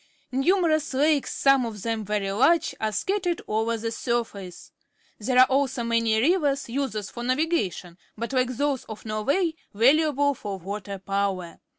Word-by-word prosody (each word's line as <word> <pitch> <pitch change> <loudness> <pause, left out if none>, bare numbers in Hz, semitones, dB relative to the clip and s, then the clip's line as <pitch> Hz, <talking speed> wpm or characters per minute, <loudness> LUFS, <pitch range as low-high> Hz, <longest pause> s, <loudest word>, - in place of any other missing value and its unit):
Numerous 310 +1 +1
lakes, 295 +1 +2
some 275 -2 +3
of 215 -4 -6
them 225 -1 -2
very 205 -1 -2
large, 275 +11 +3
are 220 -1 0
scattered 355 - -1
over 225 +2 0
the 225 +1 -3
surface. 225 -7 -4 0.5
There 250 +4 0
are 255 - +9
also 265 -2 0
many 230 -1 +2
rivers, 290 0 +2
usele.ss 230 -5 -3
for 240 - -7
na\agation, 255 - -1 0.2
but, 235 +3 -4
jike 255 -2 0
those 285 -3 0
of 220 - -9
Norwayj^_yaluable 285 - +1
for 200 -5 -5
water 200 +2 -6
power. 195 -3 -2
240 Hz, 145 wpm, -25 LUFS, 210-280 Hz, 0.5 s, are